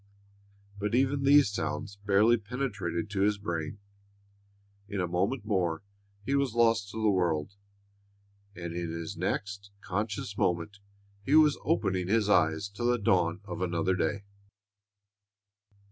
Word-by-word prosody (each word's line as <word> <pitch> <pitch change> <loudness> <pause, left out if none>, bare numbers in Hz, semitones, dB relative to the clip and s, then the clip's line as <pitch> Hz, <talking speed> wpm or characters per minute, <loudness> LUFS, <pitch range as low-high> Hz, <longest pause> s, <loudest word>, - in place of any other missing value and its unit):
But 105 +3 -1
even 135 +2 +2
these 140 -5 +6
sounds 105 0 -4
barely 105 +3 +4
penetrated 105 -6 -3
to 100 -1 -1
his 105 +1 +2
brain. 85 -3 -4 1.1
In 100 -2 -4
a 90 - 0
moment 100 +7 -1
more 90 -5 0 0.4
he 135 - -1
was 140 -4 +1
lost 115 -3 +3
to 110 - -6
the 110 -1 +3
world, 85 -1 0 1.0
and 85 -1 -6
in 85 -1 -3
his 85 0 -5
next 100 0 -3
conscious 105 +1 -3
moment 90 +4 -1 0.4
he 140 +8 +2
was 155 -2 +5
opening 95 - 0
his 105 0 +2
eyes 80 -2 +3
to 100 +4 -7
the 120 0 +3
dawn 90 -4 +1
of 105 - -6
another 90 +1 0
day. 100 +2 -1
100 Hz, 135 wpm, -29 LUFS, 90-110 Hz, 1.1 s, these